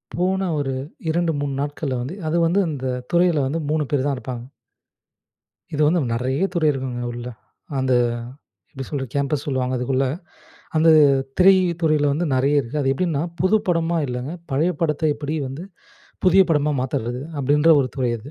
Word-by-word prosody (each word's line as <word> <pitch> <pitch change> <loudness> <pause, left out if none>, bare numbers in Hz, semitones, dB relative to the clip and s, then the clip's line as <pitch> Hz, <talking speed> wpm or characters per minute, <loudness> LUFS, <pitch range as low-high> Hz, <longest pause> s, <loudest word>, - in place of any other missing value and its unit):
போன 190 +2 0
ஒரு 135 -2 -2 0.4
2 170 0 +1
3 140 -1 -2
நாட்கள்ல 145 -2 -3
வந்து 140 +10 -5
அது 170 - +1
வந்து 180 +5 +2
அந்த 140 -4 -5 0.3
துறையில 170 -5 +3
வந்து 160 +5 -2
3 155 -1 +1
பேரு 140 -3 +1
தான் 140 - 0
இருப்பாங்க. 125 -2 -6 1.3
இது 150 - 0
வந்து 170 0 +2
நெறைய 130 +8 -1
துறை 160 -3 +2
இருக்குங்க 130 -3 -4
உள்ள. 120 0 -7 0.5
அந்த 130 -1 +1 0.8
எப்டி 135 -1 -6
சொல்றது? 135 -5 -4
கேம்பஸ் 140 0 0
சொல்லுவாங்க 130 -2 -1
அதுக்குள்ள. 130 +2 0 0.7
அந்த 160 +1 +4 0.5
திரை 190 +1 +7 0.3
துறையில 150 -2 +3
வந்து 165 +4 -1
நெறைய 140 +3 +3
இருக்கு. 125 +3 -6
அது 135 -1 +1
எப்டின்னா 155 -2 -1 0.2
புது 185 +4 +4
படமா 165 -1 +1
இல்லங்க, 125 +4 -4 0.2
பழைய 160 +7 +2
படத்த 155 -1 +1
எப்டி 150 +2 -4
வந்து 145 +7 -7 0.6
புதிய 190 +2 +7
படமா 150 -1 +2
மாத்தறது? 125 -1 -2 0.2
அப்டின்ற 150 +4 +4
ஒரு 130 - -2
துறை 125 -2 0
அது. 130 +7 -11
145 Hz, 160 wpm, -22 LUFS, 130-165 Hz, 1.3 s, திரை